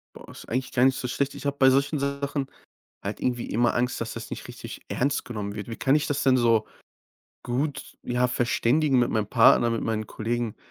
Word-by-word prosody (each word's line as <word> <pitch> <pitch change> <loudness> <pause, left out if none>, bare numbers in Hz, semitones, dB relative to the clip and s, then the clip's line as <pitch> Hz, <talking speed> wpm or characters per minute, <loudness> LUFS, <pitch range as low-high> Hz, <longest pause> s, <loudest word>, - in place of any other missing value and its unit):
Boah, - - -12
ist - - -12
eigentlich 130 +3 -2
gar 125 0 +3
nicht 130 0 +3
so 125 - -3
schlecht. 140 +3 -2
Ich - - -9
habe 140 0 -1
bei 130 -1 +6
solchen 140 +3 +2
Sachen 140 0 -2 0.6
halt - - -4
irgendwie 120 -1 -1
immer 120 +1 +1
Angst, 125 +1 0
dass - - -3
das - - -7
nicht - - -7
richtig - - -9
ernst 140 +2 -1
genommen 105 -3 -5
wird. 105 -2 -6
Wie 115 - -5
kann 135 +4 +2
ich 150 - +2
das 145 0 -1
denn, 130 -2 +4
so, 115 -3 +3 0.8
gut, 135 +3 -3
ja, 125 +1 +1
verständigen 125 +3 +2
mit 120 - +2
meinem 105 -2 0
Partner, 115 +1 +5
mit 115 - -1
meinen 110 -1 -2
Kollegen, 115 +1 -3
125 Hz, 215 wpm, -26 LUFS, 115-140 Hz, 0.8 s, bei